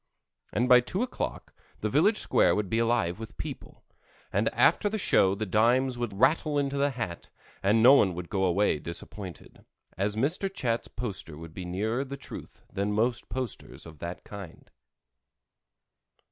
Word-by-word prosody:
and 120 +4 +1
by 125 -1 +8
two 180 - -2
o'clock 255 - -5 0.3
the - - 0
village 215 +1 +3
square - - +3
would 105 -2 -2
be 115 - +2
alive 115 -6 +1
with 110 -5 -9
people, - - -8 0.5
and - - +2
after 205 - +3
the 220 - -2
show 95 - +3
the 110 +2 -3
dimes 120 +6 +3
would 120 -5 -4
rattle 150 +3 +3
into 140 -1 0
the 140 +1 +2
hat 115 -10 -5 0.3
and 105 +3 +3
no 130 +3 +9
one 95 -10 +4
would 90 0 -6
go 95 0 -1
away 95 -3 +2
disappointed, 85 +3 -6 0.3
as 100 +4 -1
Mr. 160 - 0
Chat's 120 -11 -1
poster 100 -9 -6
would 80 0 -10
be 90 +1 -6
nearer 110 +8 -1
the 140 0 -7
truth - - -10
than 100 +1 -1
most 115 +3 0
posters 130 -4 -5
of 80 -3 -13
its 85 +1 -5
kind. 100 -5 -10
110 Hz, 165 wpm, -28 LUFS, 95-130 Hz, 0.5 s, no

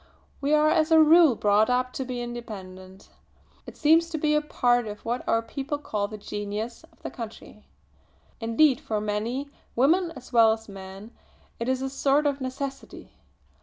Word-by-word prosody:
We 285 +2 +2
are 305 0 +4
as 315 -1 +2
a 320 -1 +6
rule 315 -3 +6
brought 210 +1 +3
up 255 0 0
to 265 - -3
be 250 -1 -4
independent. 190 -5 -9 0.6
It - - -10
seems 325 +2 +4
to 325 - -3
be 300 0 +1
a 300 - +3
part 245 -5 +1
of 210 0 -8
what 240 +2 -2
our 225 0 +2
people 275 +5 -4
call 210 -8 -3
the 215 +1 -8
'genius' 210 +3 -5
of - - -29
the - - -5
country. 225 -2 -10 0.7
Indeed 250 +4 +3
for 225 -8 -2
many, 225 +7 -3 0.2
women 330 +8 +3
as 255 -1 -13
well 225 -2 +6
as 225 0 -8
men, 195 +2 -10 0.5
it 230 +2 -2
is 260 0 0
a - - -1
sort 280 +2 +2
of 285 -1 0
necessity. 265 +1 -6
245 Hz, 175 wpm, -26 LUFS, 215-290 Hz, 0.7 s, a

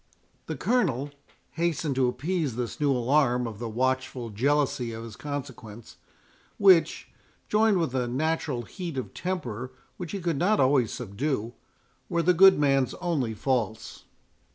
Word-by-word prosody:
The - - -3
Colonel 145 - 0 0.4
hastened 165 -3 -1
to 130 -1 +2
appease 145 +2 -2
this 120 -1 -4
new 145 -2 +2
alarm 125 0 +2
of 110 -3 -6
the 115 -1 -4
watchful 130 0 -1
jealousy 130 0 0
of 110 0 -7
his 115 -2 -9
consequence, 125 -6 -7 0.6
which, 190 -5 +4 0.4
joined 215 -1 +3
with 165 -7 -1
a 125 -2 0
natural 145 -1 -1
heat 170 - -7
of 130 - -5
temper 130 - -4 0.3
which 175 -4 -6
he 200 - -2
could 170 -4 -1
not 210 +4 +2
always 130 -4 +3
subdue, 120 +1 -3 0.6
were 170 -1 0
the 180 +2 +4
good 190 +2 +7
man's 135 -3 +2
only 145 -11 -2
faults. 115 -3 -2
135 Hz, 145 wpm, -27 LUFS, 120-165 Hz, 0.6 s, good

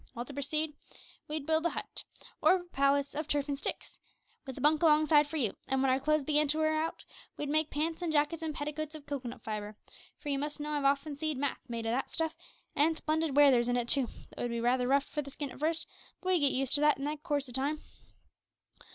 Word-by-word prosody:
Well, 240 +1 -4
to 285 - -10
proceed: 300 +2 -2 0.5
we'd 300 -1 -3
build 320 +1 +2
a - - 0
hut - - -5 0.4
or - - +6
a 365 - -3
palace 280 -4 +1
of 305 +1 -3
turf 290 -1 0
an' 285 - -1
sticks, 275 - -5 0.5
with 265 - -6
a - - -5
bunk 300 +2 +4
alongside 305 -2 +5
for 320 - -4
you; 240 -8 +2 0.2
an 265 - +1
w'en 265 0 +3
our 260 - +2
clo'se 305 +1 +2
began 300 +1 +2
for 285 - +2
to - - -4
wear 310 0 +2
out, 325 - -5 0.3
we'd 290 - -3
make 310 +1 +2
pants 320 +3 -2
and 340 -2 -1
jackets 300 +2 +1
and 315 -2 -3
petticoats 300 +1 -4
of 300 -2 -10
cocoanut 250 -5 -5
fibre; 210 -1 -5 0.4
for 295 - -7
you 275 -1 +1
must 295 +1 -3
know 300 +1 -4
I've 290 -2 -1
often 280 +2 +1
see'd 310 -3 -1
mats 275 -1 -3
made 230 -1 -4
o' 225 - 0
that 260 +3 -1
stuff, 320 -1 -1 0.4
an' 315 +3 +3
splendid 315 -2 -1
wear 290 -1 +8
there's 240 -2 +3
in 245 0 +1
it 240 -1 -1
too, 265 -1 +2 0.2
though - - -13
it - - -2
would - - -2
be 235 0 -2
rather 245 +1 +2
rough 280 +2 +3
for 300 - -3
the 280 - -9
skin 280 0 -5
at - - -11
first; 315 +1 0 0.3
but 370 - -4
we'd 365 -2 +4
get 285 -2 +5
used 265 0 +1
to 290 - +6
that 300 0 +5
in 295 +3 -3
coorse 290 -3 -1
o' - - -9
time. 280 +5 -1
290 Hz, 250 wpm, -31 LUFS, 270-310 Hz, 0.5 s, wear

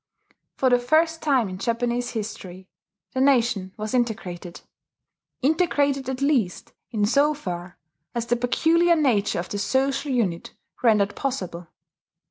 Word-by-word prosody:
For 260 -1 +2
the 245 - +5
first 320 +6 +2
time 270 -7 +2
in 185 0 -7
Japanese 240 +2 -1
history 190 -4 -6 0.5
the 260 - 0
nation 235 -8 +2
was 215 +1 -4
integrated, 195 -8 -2 0.8
integrated, 285 -3 +1
at 265 0 -4
least, 250 -11 0 0.2
in 215 -3 0
so 285 +7 +3
far 180 -8 -6 0.4
as 235 -1 -1
the 240 +1 +1
peculiar 325 +8 +3
nature 245 -10 +1
of 175 +1 -4
the 205 - -3
social 270 +5 0
unit 200 -10 -1 0.3
rendered 210 -4 +3
possible. 180 -11 -4
245 Hz, 130 wpm, -24 LUFS, 200-275 Hz, 0.8 s, the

